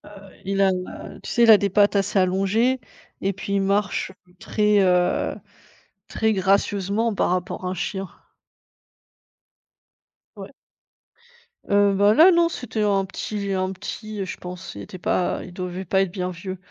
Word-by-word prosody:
heu, 195 - -13 0.2
il 195 0 0
a 190 -1 +4
la 180 0 -6
tu - - -8
sais, 240 - +3
il 230 - +8
a 215 - +9
des 200 0 0
pattes 205 0 +3
assez 195 0 +1
allongées 195 +8 +1 0.4
et 195 0 0
puis 200 +1 -5
il 200 - +2
marche 200 -1 0 0.3
très, 210 -1 +2
heu, 180 -1 +2 0.7
très 220 0 0
gracieusement 200 +3 +1
par - - 0
rapport 180 +1 -2
à 180 - -1
un - - -2
chien. 190 +1 -4 2.3
Ouais. - - -10 1.2
Heu, 200 0 +4
bah, 205 +2 +4
là 330 +10 +7
non, 340 -1 +3
c'était 225 -8 -4
un 195 -2 +2
petit 200 +1 -4
un 185 0 -1
petit, 215 +2 -7
heu, 195 - -2
je 185 - -6
pense 180 +1 -8
il 100 - -7
était 185 - -9
pas 180 +1 0
il 180 - -12
devait 180 +1 -5
pas 190 +3 +2
être 195 -3 -1
bien 180 -2 -3
vieux. 185 +2 -7
195 Hz, 170 wpm, -23 LUFS, 185-210 Hz, 2.3 s, a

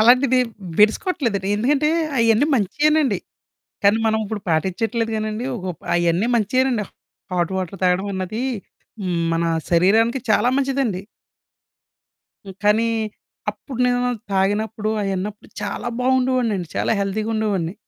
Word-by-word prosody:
అలాంటిది 255 +3 +5 0.4
బెడినికొట్లేదండి. 215 - +2
ఎందుకంటే 280 +7 +2 0.3
అయన్నీ 230 +4 +4
మంచియేనండి. 280 - +2 0.7
కానీ 200 +2 +5
మనం 220 0 +2
ఇప్పుడు 210 0 -4
పాటిచ్చట్లేదు 225 +8 0
గానండి. 215 +2 -3
ఒకప్ 180 -4 -6
అయన్నీ 175 +5 +2
మంచియేనండి 240 +1 +1 0.5
హాట్ 175 0 0
వాటర్ 185 +1 -4
తాగడం 180 +2 +2
అన్నది, 190 +5 -3 0.6
హ్మ్, 180 -3 -1
మన 165 0 0 0.3
శరీరానికి 220 +9 +4
చాలా 215 +3 +3
మంచిదండి. 270 -8 0 1.4
హ్మ్. 195 - -9
కానీ 215 +2 +3 0.6
అప్పుడు 260 -4 -9
నేను 245 0 +1 0.2
తాగినప్పుడు 210 +3 0
అయిన్నపుడు 195 +2 -4
చాలా 205 +3 -3
బాగుండేవోడినండి. 250 -7 +1
చాలా - - +1
హెల్థీ‌గా 210 +3 -2
ఉండేవోడిని. 195 -6 -1
215 Hz, 110 wpm, -21 LUFS, 190-245 Hz, 1.4 s, అలాంటిది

